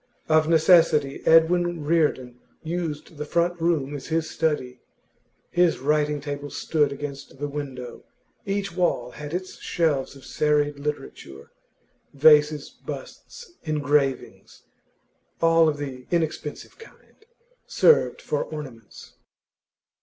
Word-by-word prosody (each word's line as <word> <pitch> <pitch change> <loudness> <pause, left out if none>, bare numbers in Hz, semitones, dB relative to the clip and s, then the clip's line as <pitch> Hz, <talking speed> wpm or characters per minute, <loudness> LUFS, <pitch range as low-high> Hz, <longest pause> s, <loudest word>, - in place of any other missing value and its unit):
Of 155 0 +3
necessity, 160 -4 +4
Edwin 170 0 +4
Reardon 145 -6 0 0.2
used 165 -2 -5
the 150 - -4
front 170 +2 0
room 155 -5 0
as 140 - -8
his 160 0 -1
study. 150 -7 -2 0.7
His 175 -1 +3
writing 150 +1 0
table 145 0 -6
stood 150 -2 0
against 140 -1 -7
the 145 +2 -3
window; 135 -4 -7 0.4
each 195 -2 -3
wall 125 -9 0
had 150 -1 -8
its 185 +2 -5
shelves 150 -6 -1
of 135 - -14
serried 150 -1 0
literature; 140 - -7 0.6
vases, 150 0 +4
busts, 480 -6 -10
engravings 145 -3 -1 0.8
(all 165 -1 +4
of 145 - -3
the 130 -3 -7
inexpensive 160 - -3
kind) 445 -1 -18 0.4
served 475 - +3
for - - -1
ornaments. 130 -8 -10
150 Hz, 110 wpm, -24 LUFS, 140-165 Hz, 0.8 s, necessity